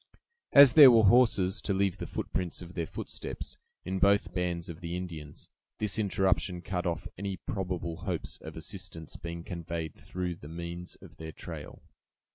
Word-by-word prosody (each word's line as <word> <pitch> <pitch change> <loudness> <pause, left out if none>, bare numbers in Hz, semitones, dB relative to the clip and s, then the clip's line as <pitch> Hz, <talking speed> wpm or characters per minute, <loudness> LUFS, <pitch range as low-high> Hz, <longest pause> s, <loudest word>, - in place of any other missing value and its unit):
As 140 -3 +9
there 145 -3 +11
were 115 -2 +6
horses, 100 -4 +4
to 100 - 0
leave 95 -2 +1
the - - -4
prints 90 0 -3
of 85 +1 -11
their 85 -3 -2
footsteps, - - -6 0.3
in 95 +1 -2
both 100 +2 +3
bands 90 -2 -2
of 85 0 -8
the 85 0 -3
Indians, 80 -5 -7 0.3
this 105 +1 -1
interruption 95 -3 +1
cut 90 -2 -2
off 85 - -2
any 100 -1 -3
probable 90 -5 -3
hopes - - -3
of 80 0 -9
assistance 85 -1 -5
being 85 0 -6
conveyed 85 -3 -5
through 90 -2 -5
the 75 - -11
means 85 +1 -6
of - - -14
their 80 0 -7
trail. - - -9
90 Hz, 165 wpm, -30 LUFS, 85-95 Hz, 0.3 s, there